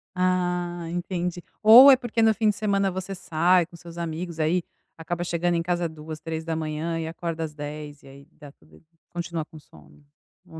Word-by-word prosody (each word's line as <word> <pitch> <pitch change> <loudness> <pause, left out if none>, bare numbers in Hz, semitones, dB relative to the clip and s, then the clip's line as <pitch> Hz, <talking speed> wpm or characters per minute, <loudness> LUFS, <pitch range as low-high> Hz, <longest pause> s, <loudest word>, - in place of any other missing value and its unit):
Ah, 180 -1 -1
entendi. 175 0 -3 0.2
Ou 245 +6 +10
é - - +8
porque 240 -2 -2
no 220 0 +5
fim 215 0 +1
de 205 - 0
semana 200 -2 +1
você 190 +1 -5
sai 175 0 +2
com 175 - -16
seus 170 0 -12
amigos, 170 0 -5
aí 165 +3 +1 0.3
acaba 175 +2 -4
chegando 175 0 0
em 165 - +1
casa 175 -1 -1
2:00, 155 0 -9
3:00 160 0 -3
e 160 - -3
acorda 165 0 -4
às 155 -1 -5
10:00 150 0 -8
e - - -15
aí 140 +2 -15
dá 145 -3 -14
tudo 155 - -22 0.3
continua 170 -2 -4
com 160 - -15
sono, 75 - -20 0.4
ou 160 - -11
170 Hz, 185 wpm, -25 LUFS, 160-180 Hz, 0.4 s, Ou